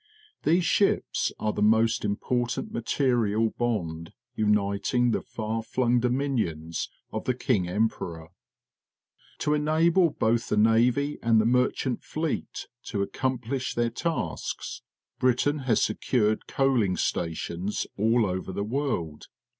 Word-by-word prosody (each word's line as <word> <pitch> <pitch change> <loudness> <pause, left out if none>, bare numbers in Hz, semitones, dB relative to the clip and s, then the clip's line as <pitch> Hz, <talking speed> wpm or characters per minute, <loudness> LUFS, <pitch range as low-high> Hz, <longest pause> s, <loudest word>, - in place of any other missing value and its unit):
These 170 +3 +2
ships 200 - +1
are 105 -1 -1
the 105 - -3
most 110 +1 +3
important 120 +4 -1
material 115 -3 +1
bond 85 -9 -3 0.2
uniting 105 +3 +1
the - - 0
far 110 0 -4
flung 120 +1 +1
dominions 115 - -1 0.2
of - - -3
the 125 - +1
King 110 -8 +1
Emperor. 90 -5 -2 1.1
To 150 - +2
enable 160 +4 +3
both 115 -4 0
the 105 - +1
navy 120 +6 +3
and 115 -1 +4
the 110 - +2
mer 125 +2 +4
chant 130 -3 -3
fleet 155 -1 -3 0.2
to 100 -3 -1
accomplish 130 +3 -2
their 120 0 +1
tasks, 165 +7 -3 0.4
Brit 125 -1 +2
ain 145 +1 +1
has 115 - +4
secured 110 0 0
coaling 125 -9 +1
stations 85 +3 -2
all 115 +2 +3
over 95 0 -3
the 100 - -2
world. 105 - -3
115 Hz, 125 wpm, -27 LUFS, 105-130 Hz, 1.1 s, and